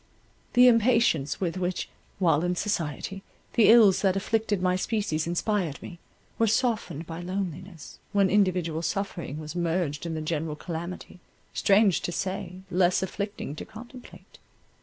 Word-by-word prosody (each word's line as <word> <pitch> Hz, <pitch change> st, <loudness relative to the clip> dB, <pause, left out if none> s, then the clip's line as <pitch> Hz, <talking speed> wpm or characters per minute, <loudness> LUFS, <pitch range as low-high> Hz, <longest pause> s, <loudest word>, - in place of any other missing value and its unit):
The 250 Hz, 0 st, +7 dB
impatience 230 Hz, -, +3 dB
with 180 Hz, -1 st, -2 dB
which, 180 Hz, 0 st, -2 dB, 0.3 s
while 165 Hz, -4 st, +2 dB
in 180 Hz, 0 st, 0 dB
society, 190 Hz, 0 st, -3 dB, 0.3 s
the 225 Hz, -, +5 dB
ills 210 Hz, -5 st, +7 dB
that 195 Hz, -2 st, +2 dB
afflicted 210 Hz, +1 st, 0 dB
my 180 Hz, 0 st, +1 dB
species 185 Hz, -6 st, -1 dB
inspired 175 Hz, -3 st, -1 dB
me, 175 Hz, -, -10 dB, 0.4 s
were 225 Hz, -, +4 dB
softened 215 Hz, -, 0 dB
by 165 Hz, +1 st, -7 dB
loneliness, 185 Hz, -2 st, -6 dB
when 200 Hz, -2 st, +3 dB
individual 180 Hz, -5 st, +1 dB
suffering 170 Hz, -3 st, -3 dB
was 155 Hz, +1 st, -7 dB
merged 170 Hz, -3 st, -1 dB
in 165 Hz, -, -3 dB
the 155 Hz, -, -3 dB
general 155 Hz, -1 st, -2 dB
calamity, 175 Hz, +3 st, -7 dB, 0.3 s
strange 200 Hz, -2 st, +3 dB
to -, -, -3 dB
say, 185 Hz, 0 st, -4 dB
less 180 Hz, +1 st, +3 dB
afflicting 200 Hz, -5 st, -4 dB
to -, -, -5 dB
contemplate. 240 Hz, +3 st, -13 dB
185 Hz, 140 wpm, -27 LUFS, 165-205 Hz, 0.4 s, The